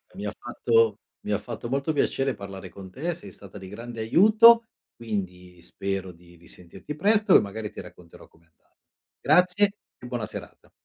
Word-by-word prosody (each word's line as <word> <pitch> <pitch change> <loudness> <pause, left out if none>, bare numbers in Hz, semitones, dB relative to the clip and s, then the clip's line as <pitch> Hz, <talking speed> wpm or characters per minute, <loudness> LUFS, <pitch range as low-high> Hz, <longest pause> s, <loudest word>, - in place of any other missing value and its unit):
mi 100 - -6
ha 105 - -2
fatto 115 -3 +1 0.3
mi 105 - -4
ha 105 - +2
fatto 115 +1 -7
molto 140 +4 -1
piacere 135 -1 0
parlare 95 -3 -9
con 95 +1 -11
te, 160 - -3
sei 170 - -10
stata 100 0 -11
di 95 - -10
grande 115 +2 -8
aiuto, 220 - +6 0.3
quindi 90 -5 -6
spero 95 +1 -4
di 85 0 -19
risentirti 85 - -10
presto 205 +4 +3
e - - +9
magari 105 +1 -5
ti - - -10
racconterò 90 -2 -13
com'è 80 +1 -27
andata. 80 - -41 0.4
Grazie 180 +6 +3 0.3
e 125 - -10
buona 120 -3 -3
serata. - - -10
110 Hz, 170 wpm, -25 LUFS, 95-150 Hz, 0.4 s, e